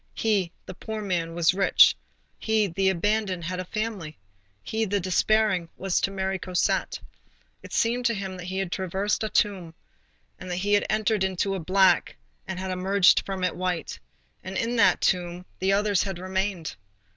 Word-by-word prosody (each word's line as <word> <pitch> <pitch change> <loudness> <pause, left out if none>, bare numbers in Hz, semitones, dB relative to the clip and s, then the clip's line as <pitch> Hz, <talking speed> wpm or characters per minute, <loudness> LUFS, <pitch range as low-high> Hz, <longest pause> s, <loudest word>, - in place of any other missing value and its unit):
He, 200 -6 0
the - - -8
poor 220 +3 -6
man, 170 -4 -2
was 170 0 +3
rich; 195 +1 +5 0.4
he, 220 -1 +1
the 190 +1 +1
abandoned, 190 0 0
had 180 +3 -3
a 185 - -4
family; 205 -7 -4 0.5
he, 220 0 -2
the 205 -1 0
despairing, 190 -1 +1
was 190 -1 0
to - - +1
marry 190 -1 -2
Cosette. 180 0 -1 0.6
It - - -12
seemed 240 +1 +1
to 230 - 0
him 195 -1 -5
that 180 - -8
he 190 +1 -4
had 190 -2 -2
traversed 190 +4 -1
a 215 - -1
tomb, 185 -8 0 0.6
and 185 - -8
that 175 - -2
he 200 +3 0
had 205 - +3
entered 215 -2 +1
into 190 +1 -1
it 180 -5 -5
black 190 -2 +3 0.3
and 190 - -4
had 190 0 -4
emerged 185 +1 +4
from 190 -1 -3
it 180 - 0
white, 180 - -3 0.4
and 190 +1 -5
in 235 +1 -1
that 190 -5 +4
tomb 180 0 0
the 190 +1 +1
others 205 -1 +2
had 195 -3 -3
remained. 190 -2 -3
190 Hz, 180 wpm, -26 LUFS, 180-205 Hz, 0.6 s, rich